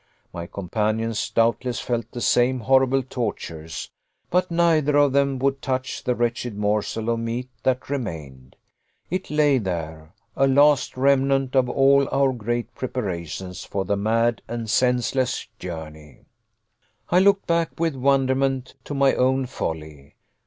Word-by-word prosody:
My 85 Hz, 0 st, -6 dB
companions, 110 Hz, +4 st, -2 dB
doubtless, 115 Hz, +2 st, +1 dB
felt 120 Hz, -2 st, -2 dB
the 120 Hz, -, -7 dB
same 125 Hz, +1 st, +2 dB
horrible 130 Hz, +2 st, +3 dB
tortures, 85 Hz, -, -5 dB, 0.4 s
but 180 Hz, +1 st, +2 dB
neither 160 Hz, -4 st, +3 dB
of 145 Hz, -2 st, +4 dB
them 140 Hz, -1 st, +2 dB
would 135 Hz, +1 st, 0 dB
touch 130 Hz, -1 st, -3 dB
the 125 Hz, -, 0 dB
wretched 120 Hz, -2 st, -2 dB
morsel 105 Hz, +2 st, -1 dB
of 115 Hz, -, -1 dB
meat 120 Hz, +3 st, -4 dB
that 130 Hz, +1 st, 0 dB
remained. 75 Hz, -, -6 dB, 0.6 s
It 185 Hz, +1 st, -3 dB
lay 150 Hz, -3 st, +3 dB
there, 80 Hz, -5 st, -5 dB, 0.2 s
a 135 Hz, -, +3 dB
last 140 Hz, 0 st, +3 dB
remnant 135 Hz, 0 st, +2 dB
of 130 Hz, -1 st, +3 dB
all 140 Hz, +1 st, +4 dB
our 135 Hz, -1 st, +2 dB
great 120 Hz, 0 st, -3 dB
preparations 95 Hz, -7 st, -5 dB
for 95 Hz, -1 st, -3 dB
the 100 Hz, -, 0 dB
mad 115 Hz, +3 st, +1 dB
and 115 Hz, 0 st, -4 dB
senseless 125 Hz, +2 st, +1 dB
journey! 80 Hz, -4 st, -9 dB, 0.9 s
I 180 Hz, -, +5 dB
looked 195 Hz, +1 st, +4 dB
back, 170 Hz, -1 st, 0 dB
with 165 Hz, -3 st, 0 dB
wonderment, 135 Hz, 0 st, +1 dB
to 145 Hz, -, -5 dB
my 135 Hz, -1 st, +4 dB
own 130 Hz, +1 st, +2 dB
folly. 75 Hz, -, -6 dB
125 Hz, 140 wpm, -23 LUFS, 105-135 Hz, 0.9 s, I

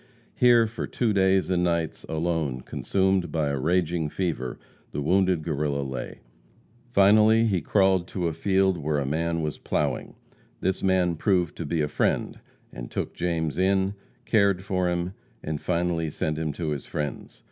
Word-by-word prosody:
Here, 120 Hz, -2 st, +5 dB
for 115 Hz, +1 st, -5 dB
two 115 Hz, -4 st, 0 dB
days 95 Hz, -1 st, +2 dB
and 90 Hz, -1 st, +2 dB
nights, 85 Hz, -2 st, -1 dB
alone, 80 Hz, -5 st, -1 dB
consumed 95 Hz, +2 st, 0 dB
by 75 Hz, -2 st, 0 dB
a 70 Hz, -1 st, -1 dB
raging 85 Hz, +1 st, 0 dB
fever, 75 Hz, -9 st, -3 dB, 0.3 s
the -, -, -4 dB
wounded 90 Hz, 0 st, +2 dB
Guerrilla 75 Hz, -3 st, -1 dB
lay. 65 Hz, -2 st, -6 dB, 0.7 s
Finally 110 Hz, +1 st, +5 dB
he 95 Hz, -6 st, +1 dB
crawled 95 Hz, +1 st, +2 dB
to 90 Hz, -3 st, -2 dB
a 80 Hz, -, -2 dB
field 95 Hz, +1 st, +1 dB
where 75 Hz, 0 st, -1 dB
a 70 Hz, -, -1 dB
man 85 Hz, +3 st, -1 dB
was 75 Hz, -1 st, -3 dB
ploughing. -, -, -2 dB, 0.4 s
This 95 Hz, +1 st, -1 dB
man 90 Hz, -3 st, +2 dB
proved 90 Hz, -3 st, +1 dB
to 80 Hz, -, -4 dB
be 80 Hz, +1 st, 0 dB
a -, -, 0 dB
friend, 75 Hz, -, -1 dB, 0.3 s
and -, -, -7 dB
took -, -, -3 dB
James 85 Hz, -2 st, -2 dB
in, 95 Hz, +1 st, +2 dB, 0.3 s
cared 100 Hz, -4 st, +2 dB
for 90 Hz, -2 st, 0 dB
him, 90 Hz, +1 st, -2 dB, 0.3 s
and 75 Hz, -1 st, -3 dB
finally 85 Hz, -2 st, 0 dB
sent 75 Hz, +1 st, -2 dB
him 80 Hz, -1 st, -1 dB
to 80 Hz, +1 st, -3 dB
his 75 Hz, -4 st, -4 dB
friends. 75 Hz, -1 st, -5 dB
85 Hz, 165 wpm, -26 LUFS, 75-95 Hz, 0.7 s, Here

